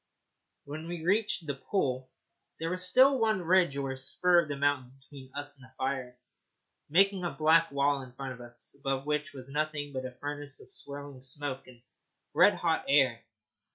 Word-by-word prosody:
When 155 +3 -6
we 170 -2 -5
reached 200 -2 +2
the 145 - -2
pool 130 -4 -1 0.5
there 165 +1 -2
was 185 0 -2
still 260 +8 +5
one 220 -5 +2
ridge 175 -4 +3
or 135 -1 -2
spur 140 +7 +3
of 155 - -8
the 145 - -2
mountains 140 -3 +1
between 135 -1 -14
us 145 0 -4
and 130 - -14
the - - -29
fire, 130 -2 -2 0.7
making 195 +3 +4
a 175 - 0
black 165 +1 +4
wall 140 0 +2
in 130 -1 -10
front 135 0 -5
of 125 - -12
us, 120 +2 -11
above 135 -1 -2
which 150 -1 -1
was 135 -1 -9
nothing 150 -1 -2
but 130 -1 -3
a - - -9
furnace 145 +1 -6
of - - -16
swirling 140 -2 -8
smoke 135 0 -5
and 120 -2 -16 0.5
red - - +6
hot - - 0
air. 130 -5 +4
145 Hz, 185 wpm, -30 LUFS, 130-165 Hz, 0.7 s, red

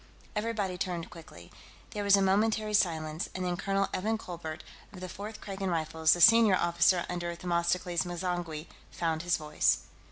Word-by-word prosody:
Everybody 210 -4 -2
turned 175 -3 -3
quickly. 165 -2 -13 0.4
There 210 -2 -3
was 200 0 +6
a 195 - +2
momentary 215 +2 +1
silence, 160 -5 0
and 185 0 -3
then 180 -1 -1
Colonel 195 +1 0
Evan 220 +4 0
Colbert, 165 -5 -7 0.3
of 190 - -11
the 185 - -6
Fourth 205 +4 -8
Kragan 195 -1 -4
Rifles, 160 -1 +2
the 175 - -2
senior 225 -2 +7
officer 175 0 +2
under 175 -1 -3
Themistocles 175 0 0
M'zangwe, 175 -3 -4 0.2
found 165 -2 -2
his 175 0 +1
voice. 150 -1 +1
180 Hz, 160 wpm, -30 LUFS, 170-195 Hz, 0.4 s, senior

